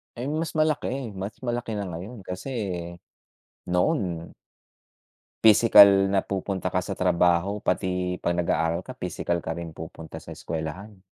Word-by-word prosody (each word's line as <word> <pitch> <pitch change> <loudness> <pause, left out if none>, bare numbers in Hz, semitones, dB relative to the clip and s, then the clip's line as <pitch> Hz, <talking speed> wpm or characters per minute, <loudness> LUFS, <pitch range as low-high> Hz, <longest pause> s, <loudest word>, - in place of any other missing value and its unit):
Eh, 125 +2 -4
mas 160 +3 -2
malaki, 145 -6 0
mas 95 +2 -5
malaki 120 -1 -2
na 100 - -2
ngayon 95 +6 -8
kasi 90 +9 -6 1.2
noon 90 - 0 1.1
pisikal 100 -3 +8
na 95 -1 +2
pupunta 95 -1 -2
ka - - +2
sa - - -5
trabaho 90 +2 +2
pati 90 -2 -1
‘pag 85 - +1
nag-aaral 80 -1 +1
ka, - - -7
pisikal 85 - -2
ka 80 - -3
rin 85 -1 -5
pupunta 80 0 -9
sa - - -9
eskuwelahan. 85 +6 -6
95 Hz, 135 wpm, -26 LUFS, 85-110 Hz, 1.2 s, pisikal